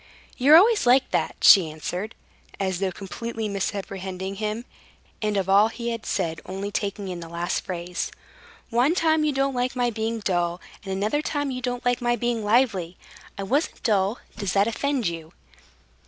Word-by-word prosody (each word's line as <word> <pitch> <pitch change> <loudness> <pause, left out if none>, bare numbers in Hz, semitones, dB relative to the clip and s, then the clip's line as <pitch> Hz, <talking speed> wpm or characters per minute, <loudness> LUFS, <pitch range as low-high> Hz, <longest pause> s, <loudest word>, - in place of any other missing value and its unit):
"You're 290 +5 +7
always 420 - +4
like 255 +2 +4
that," - - 0
she 185 -6 +8
answered, 180 +7 -5 0.4
as 190 -2 -1
though 190 -1 0
completely 220 +4 -5
misapprehending 195 -1 -4
him, 215 +3 -3 0.6
and 210 -2 0
of 195 -1 0
all 200 +2 +6
he 235 +1 -4
had 230 -1 -5
said 165 -4 -1
only 195 +2 -5
taking 200 -1 -3
in 180 -2 -5
the 165 -1 -8
last 170 +2 -2
phrase. 175 -1 -4 0.6
"One 250 +8 +3
time 315 -2 +3
you 305 - +2
don't 275 0 0
like 250 +1 -1
my 245 -1 +1
being 225 +1 -2
dull, 175 -3 0 0.2
and 195 - -6
another 210 +9 0
time 290 -2 -2
you 255 0 -4
don't 245 0 -3
like 245 0 +1
my 240 0 +2
being 240 -1 -1
lively. 205 -6 +1 0.4
I 200 - -3
wasn't 275 +10 -1
dull. 205 0 +2 0.2
Does 200 -3 -2
that 200 0 +4
offend 265 +2 -1
you?" 165 -2 -4
210 Hz, 175 wpm, -25 LUFS, 190-245 Hz, 0.6 s, she